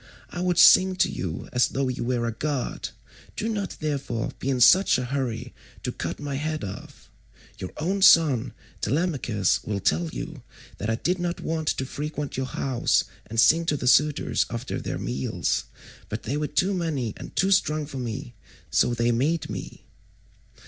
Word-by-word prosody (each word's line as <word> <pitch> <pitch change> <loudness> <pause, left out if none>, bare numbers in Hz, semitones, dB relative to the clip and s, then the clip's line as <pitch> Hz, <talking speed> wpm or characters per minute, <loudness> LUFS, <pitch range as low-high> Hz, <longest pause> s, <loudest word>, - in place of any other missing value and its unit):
I 175 - -4
would 180 -1 +1
sing 185 +1 +7
to - - +2
you 85 -2 -4
as 125 0 +4
though 135 0 -1
you 125 -2 -2
were 120 -1 0
a 115 - -1
god, 140 +3 -3 0.5
do 220 - -2
not 205 -3 -3
therefore 140 -7 -2
be 135 - -2
in 130 -2 +1
such 155 +10 +6
a 125 - -2
hurry 125 -3 -3 0.3
to - - -2
cut - - -5
my 145 -2 -3
head 155 +2 -3
off. 100 0 -9 0.5
Your 90 - -5
own 190 +6 -1
son 155 - +5 0.3
Telemachus 130 - 0
will 105 -2 -2
tell 170 - +1
you 155 -2 -7 0.4
that 105 - -3
I 110 - +2
did 180 +9 -1
not 175 0 -2
want 160 -1 -2
to 130 - 0
frequent 150 +1 -5
your 130 0 -2
house 130 -1 +1 0.2
and 115 +1 -2
sing 160 +9 +6
to 150 - +1
the 125 - -5
suitors 150 +4 +3
after - - -4
their - - -3
meals, 65 +2 -2 0.4
but - - -4
they 140 - -2
were 150 0 -1
too 190 +6 +1
many 150 - -2
and - - -10
too 190 +1 +2
strong 155 -5 +2
for 135 -2 -7
me, 115 - -5 0.4
so 120 - +3
they 120 +1 +2
made 145 +8 0
me." - - -7
140 Hz, 180 wpm, -25 LUFS, 120-165 Hz, 0.5 s, sing